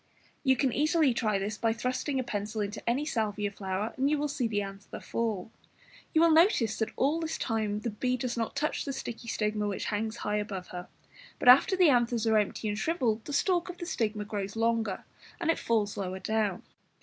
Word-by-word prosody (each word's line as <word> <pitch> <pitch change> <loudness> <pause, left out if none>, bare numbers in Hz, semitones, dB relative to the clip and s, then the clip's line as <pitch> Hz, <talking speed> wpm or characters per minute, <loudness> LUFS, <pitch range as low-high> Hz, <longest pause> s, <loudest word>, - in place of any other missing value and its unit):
you 265 -2 +4
can 260 -1 +1
easily 300 -2 +3
try 215 -4 +1
this 205 +2 -3
by 225 - +2
thrusting 255 +4 -1
a - - 0
pencil 210 -1 -3
into 205 +1 -3
any 265 +5 +1
Salvia 210 -6 -1
flower, 200 +2 -3
and 270 +2 +2
you 305 - +2
will 295 +1 0
see 265 -4 -1
the 210 -2 -1
anther 195 0 -8
fall. 220 -3 -3 0.6
You 320 - +3
will 335 0 +6
notice 315 - +4
that 220 - 0
all 295 +5 +2
this 320 -1 -3
time 215 -3 -1
the 235 - -2
be 250 +4 -1
does 245 -1 -2
not 230 +1 -2
touch 300 +2 -1
the 275 - -3
sticky 240 -2 -6
stigma 210 -1 -1
which 200 - -3
hangs 220 +2 -2
high 210 -2 -1
above 200 -3 -4
her, 180 0 -7 0.5
but - - -3
after 280 +9 +7
the 360 -4 +6
anthers 240 -3 +2
are 220 -1 +4
empty 210 +1 -2
and 210 0 -2
shrivelled 240 -9 0
the - - -6
stalk 350 +3 +1
of 355 - -7
the 345 - -5
stigma 215 -9 -1
grows 200 -1 -4
longer, 225 -3 0 0.4
and 330 -1 +2
it - - -2
falls 215 -3 0
lower 190 -1 -3
down. 210 -2 -1
225 Hz, 210 wpm, -29 LUFS, 210-270 Hz, 0.6 s, after